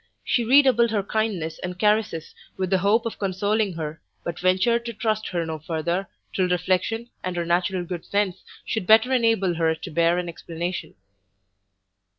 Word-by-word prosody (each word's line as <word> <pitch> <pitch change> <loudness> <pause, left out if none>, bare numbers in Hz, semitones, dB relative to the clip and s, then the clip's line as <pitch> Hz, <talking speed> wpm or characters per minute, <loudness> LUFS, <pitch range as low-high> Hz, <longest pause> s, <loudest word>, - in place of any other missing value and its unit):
She 240 - +1
redoubled 250 -1 +5
her 210 -3 0
kindness 195 -7 -2
and 180 0 -5
caresses 210 -6 +1 0.2
with 185 -1 -2
the 190 - +4
hope 210 +5 +2
of 230 - -4
consoling 200 +1 0
her, 160 -1 -5 0.2
but 170 0 -4
ventured 190 +6 +2
to 235 - -4
trust 215 0 -1
her 170 -2 -2
no 160 -1 -4
further, 170 +4 -2 0.3
till 185 -1 +1
reflection, 190 +6 0
and 185 -1 -3
her 170 -1 -1
natural 175 +2 +1
good 175 -1 -5
sense, 200 -2 -1 0.2
should 220 -5 -2
better 225 +4 +6
enable 225 -7 +2
her 165 -1 +1
to 170 - -8
bear 170 +2 +3
an 180 -1 -2
explanation. 170 +1 -5
185 Hz, 165 wpm, -24 LUFS, 170-220 Hz, 0.3 s, better